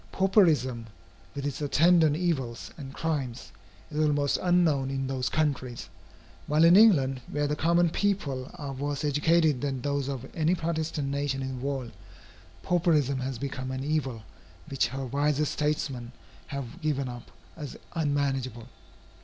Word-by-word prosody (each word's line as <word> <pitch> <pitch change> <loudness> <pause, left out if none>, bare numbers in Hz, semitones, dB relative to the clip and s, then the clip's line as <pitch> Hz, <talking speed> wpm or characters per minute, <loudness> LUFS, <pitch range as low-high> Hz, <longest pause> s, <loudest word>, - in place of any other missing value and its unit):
Pauperism, 155 - +3 0.5
with 140 0 -4
its 145 +1 -3
attendant 160 +1 +4
evils 145 -9 -2
and 135 -4 -8
crimes, 135 -5 -3 0.4
is 150 - -3
almost 145 -2 +2
unknown 165 -7 +2
in 135 0 -2
those 130 -1 -1
countries, 135 -6 -1 0.6
while 150 +2 +3
in 170 +2 +8
England, 140 - +5
where 145 0 -1
the 150 +1 0
common 170 +2 +3
people 145 -12 -1
are 140 -2 -5
worse 145 +2 -3
educated 150 -1 +3
than 135 -2 -2
those 140 -1 -1
of 135 -2 -4
any 165 +2 +2
Protestant 160 -4 -2
nation 140 -1 -1
in 130 -1 -4
the - - -8
world, 135 -4 -3 0.7
pauperism 155 -7 +2
has 130 -1 -3
become 130 0 -4
an 130 0 -3
evil 135 -7 -2 0.5
which 135 -4 +1
her 135 +2 -5
wisest 145 +3 +1
statesmen 135 -5 -2 0.3
have 140 +2 -6
given 145 -3 0
up 120 -1 -8 0.3
as 150 -4 -7 0.2
unmanageable. 135 -7 -1
145 Hz, 145 wpm, -28 LUFS, 130-155 Hz, 0.7 s, in